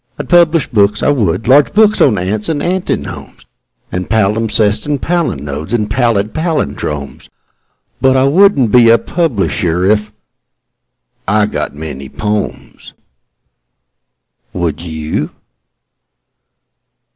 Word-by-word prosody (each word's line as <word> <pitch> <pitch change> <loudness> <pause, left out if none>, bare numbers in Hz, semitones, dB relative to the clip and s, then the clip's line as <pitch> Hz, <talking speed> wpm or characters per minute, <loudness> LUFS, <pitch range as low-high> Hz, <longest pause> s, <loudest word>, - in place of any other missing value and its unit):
I'd - - -7
publish 170 -3 +4
books, 105 -2 +1
I - - +3
would 105 - 0
large 140 +7 +4
books 215 0 +3
on 110 -7 +4
ants 105 - -1
and 155 -3 -1
antinomes 185 +1 -4 0.5
And 90 0 -4
palimpsests 110 +1 +1
and 145 -2 -1
palinodes 80 - -3
and 105 -3 -2
pallid 115 -5 0
pallindromes: 75 - -3 0.7
But 130 0 +3
I 130 - +3
wouldn't 140 - +3
be 120 -1 +6
a 115 - +6
publisher 100 - -1
if.... 105 +1 +1 1.2
I 105 +1 +2
got 105 - -4
many 70 -3 -7
"pomes." 105 +3 -5 1.6
Would 85 -3 -3
you? 80 -2 -4
110 Hz, 110 wpm, -14 LUFS, 90-140 Hz, 1.6 s, be